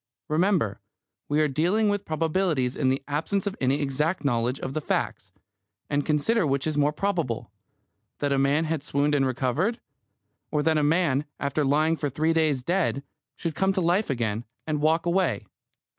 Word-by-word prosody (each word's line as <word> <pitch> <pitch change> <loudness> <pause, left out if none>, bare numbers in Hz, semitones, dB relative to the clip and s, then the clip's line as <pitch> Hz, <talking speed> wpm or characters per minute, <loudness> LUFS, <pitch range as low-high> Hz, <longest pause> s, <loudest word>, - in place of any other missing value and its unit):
Remember, 155 - +1 0.5
we 145 +1 +2
are 155 - +3
dealing 175 +10 +1
with 205 -1 0
probabilities 160 -5 0
in 130 - +1
the 135 +1 0
absence 165 +7 -1
of 200 -1 -2
any 135 +2 +2
exact 150 +4 -1
knowledge 120 0 +1
of 130 - -4
the 155 - -2
facts, - - -2 0.6
and 145 0 +1
consider 160 +7 +1
which 135 -1 0
is 155 -1 -1
more 145 0 +3
probable 165 - -2 0.7
that 145 -1 -1
a 135 - +2
man 140 +3 +3
had 155 -3 -2
swooned 145 0 +1
and 135 -2 +3
recovered; 130 - 0 0.7
or 150 -1 0
that 160 0 +3
a - - +1
man, 150 -2 +2
after 140 +2 0
lying 155 +4 +3
for 150 -2 -2
three 155 +4 +1
days 155 -5 +1
dead, 170 -4 0 0.3
should 165 -2 -3
come 190 +4 +1
to 190 - 0
life 180 +4 +2
again, 115 -4 -1 0.2
and 150 -2 -1
walk 160 +3 +2
away? 175 - +1
150 Hz, 175 wpm, -26 LUFS, 140-170 Hz, 0.7 s, are